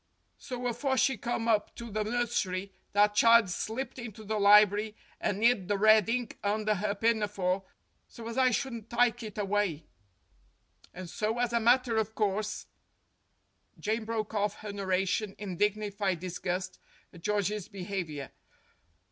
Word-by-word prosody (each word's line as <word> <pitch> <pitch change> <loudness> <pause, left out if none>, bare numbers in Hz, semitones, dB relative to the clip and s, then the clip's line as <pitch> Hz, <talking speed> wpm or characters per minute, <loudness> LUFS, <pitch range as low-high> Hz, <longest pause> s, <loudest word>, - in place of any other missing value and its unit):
So 250 -1 -6
afore 260 +3 0
she 265 +2 +3
come 235 +1 -3
up 215 -2 +1
to 235 -1 -8
the 215 +1 -1
nursery, 210 -5 -1 0.2
that 205 +1 +4
child 230 -2 +5
slipped 250 +8 -4
into 225 -2 -8
the 215 0 -2
library 210 +1 +5 0.2
and 205 +2 -1
'id 230 -6 +3
the 205 0 +1
red 215 0 +5
ink 245 0 -2
under 215 +1 0
'er 205 -1 0
pinafore 205 -4 0 0.4
so 230 -2 -10
as 230 - -5
I 260 -1 +4
shouldn't 235 -2 -3
tike 240 -1 +2
it 215 -3 -7
awye. 200 -6 -1 1.1
And 185 0 -8
so, 215 +6 -2
as 240 -1 0
a 235 - +3
matter 240 0 +3
of 220 0 -1
course 210 0 -1 0.5
" - - -36
Jane 220 +2 -1
broke 220 -1 -3
off 205 -1 0
her 210 -1 -6
narration 195 +1 -1
in 195 -4 -6
dignified 205 -2 0
disgust 185 +1 -4 0.3
at 175 - -13
George's 210 0 -1
behavior. 180 -8 -5
210 Hz, 150 wpm, -30 LUFS, 200-230 Hz, 1.1 s, child